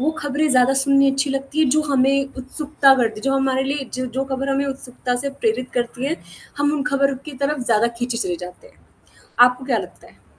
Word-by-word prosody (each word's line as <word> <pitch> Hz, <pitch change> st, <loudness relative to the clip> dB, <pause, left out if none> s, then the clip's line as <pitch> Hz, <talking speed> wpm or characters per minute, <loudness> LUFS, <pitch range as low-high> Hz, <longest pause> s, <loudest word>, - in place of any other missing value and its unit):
वो 300 Hz, +4 st, +2 dB
खबरें 295 Hz, +1 st, 0 dB
ज़्यादा 255 Hz, +1 st, +4 dB
सुननी 275 Hz, 0 st, +4 dB
अच्छी 275 Hz, +1 st, 0 dB
लगती 275 Hz, +2 st, -4 dB
है -, -, +5 dB
जो 310 Hz, -, +3 dB
हमें 275 Hz, +1 st, +2 dB
उत्सुकता 275 Hz, +1 st, +2 dB
करती 225 Hz, -3 st, 0 dB
है -, -, -16 dB
जो 270 Hz, -, +1 dB
हमारे 265 Hz, -1 st, +1 dB
लिए 275 Hz, -1 st, -3 dB
ज 255 Hz, 0 st, -3 dB
जो 270 Hz, +1 st, 0 dB
खबर 270 Hz, 0 st, -3 dB
हमें 275 Hz, +1 st, +1 dB
उत्सुकता 255 Hz, -2 st, -4 dB
से 280 Hz, -, -1 dB
प्रेरित 275 Hz, -, -2 dB
करती 245 Hz, +1 st, -2 dB
है, 325 Hz, +4 st, -1 dB, 0.4 s
हम 290 Hz, 0 st, +2 dB
उन 295 Hz, -2 st, -1 dB
खबरों 275 Hz, -1 st, +1 dB
की 305 Hz, -, -8 dB
तरफ़ 290 Hz, -1 st, 0 dB
ज़्यादा 230 Hz, -2 st, +3 dB
खींचे 245 Hz, -1 st, -2 dB
चले 180 Hz, -6 st, -2 dB
जाते 180 Hz, -, -10 dB
हैं। -, -, -26 dB, 0.6 s
आपको 250 Hz, +1 st, +5 dB
क्या 250 Hz, -4 st, +1 dB
लगता 180 Hz, -2 st, -9 dB
है? -, -, -24 dB
270 Hz, 220 wpm, -21 LUFS, 250-280 Hz, 0.6 s, है